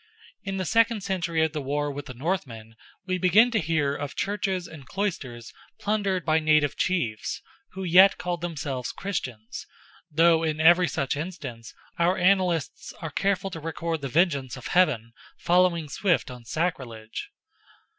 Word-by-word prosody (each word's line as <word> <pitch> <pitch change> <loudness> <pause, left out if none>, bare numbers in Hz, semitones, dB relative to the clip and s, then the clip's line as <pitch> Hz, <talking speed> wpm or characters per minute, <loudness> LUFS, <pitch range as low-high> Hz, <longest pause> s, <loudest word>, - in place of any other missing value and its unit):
In 195 -1 -3
the 185 - -2
second 230 0 +2
century 170 -4 0
of 160 - -4
the 150 - -3
war 145 +2 -1
with 145 +1 -7
the 130 - -8
Northmen 125 - -4 0.3
we 185 -1 -1
begin 205 +7 +5
to 225 - +2
hear 155 -4 0
of 145 -1 -5
churches 195 -3 -2
and 145 -5 -12
cloisters 145 - -4 0.3
plundered 200 -3 -1
by 160 -1 +3
native 155 -2 +3
chiefs, 125 -13 -1 0.3
who 190 +1 -5
yet 185 +3 +6
called 175 -1 -3
themselves 140 -7 -4
Christians, 125 - -5 0.4
though 165 +1 +4
in 155 -1 -1
every 175 +3 +6
such 135 -1 -1
instance 145 -8 -7 0.2
our 175 +2 +3
annalists 180 -6 +1
are 165 -2 -7
careful 195 +3 0
to 165 - -6
record 165 0 -3
the 140 - -4
vengeance 140 -4 +1
of 130 - -7
Heaven 125 -11 +2 0.2
following 175 -2 +2
swift 175 -1 0
on 125 -2 -11
sacrilege. 120 -8 -4
165 Hz, 155 wpm, -26 LUFS, 140-185 Hz, 0.4 s, yet